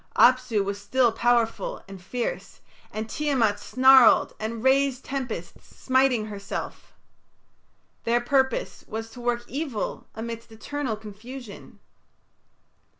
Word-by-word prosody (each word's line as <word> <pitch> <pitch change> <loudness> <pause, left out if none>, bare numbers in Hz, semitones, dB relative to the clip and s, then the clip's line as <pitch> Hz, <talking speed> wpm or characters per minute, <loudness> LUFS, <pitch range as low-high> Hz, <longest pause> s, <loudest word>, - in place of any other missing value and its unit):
Apsu 250 -4 +4
was 200 +1 -4
still 240 +3 +2
powerful 240 - 0
and 195 -1 -10
fierce, 235 +6 -4 0.3
and 220 +1 -4
Tiamat 235 -6 +1
snarled 260 -1 +6
and 220 +1 -4
raised 270 0 +2
tempests, 245 -11 -5
smiting 260 -4 +2
herself. 200 -2 -6 1.1
Their 235 +1 +2
purpose 265 0 0
was 225 +1 -5
to 245 - -10
work 240 0 -1
evil 275 -6 -4
amidst 230 +1 -6
eternal 260 +2 -4
confusion. 220 +2 -10
240 Hz, 105 wpm, -25 LUFS, 220-260 Hz, 1.1 s, snarled